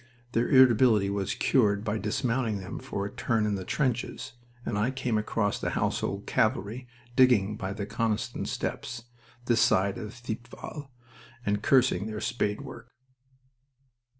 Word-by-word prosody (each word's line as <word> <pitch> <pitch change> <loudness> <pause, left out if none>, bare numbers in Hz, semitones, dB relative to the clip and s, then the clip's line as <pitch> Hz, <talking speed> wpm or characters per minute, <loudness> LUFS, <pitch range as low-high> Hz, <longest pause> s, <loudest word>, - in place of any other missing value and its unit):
Their 120 0 +1
irritability 120 -6 +5
was 100 +1 -1
cured 105 -6 +2
by 110 -1 -1
dismounting 115 0 0
them 95 -1 -6
for 125 -6 -4
a 100 - -5
turn 115 -4 0
in 105 - 0
the 95 -2 -3
trenches, 125 +3 -2 0.3
and 110 - -2
I 105 +4 +1
came 130 -3 -2
across 105 -1 0
the - - -1
Household - - -1
Cavalry 115 +6 0 0.3
digging 110 -6 +4
by 95 -1 -4
the 100 -1 -4
Coniston 110 0 -2
Steps, 120 -1 -4 0.4
this 120 -1 +3
side 95 +1 +3
of 110 +2 -7
Thiepval, 120 +4 -7 0.6
and 105 0 0
cursing 125 -4 +3
their 110 -1 -4
spade 105 0 -1
work. 135 -3 -10
110 Hz, 145 wpm, -28 LUFS, 105-125 Hz, 0.6 s, irritability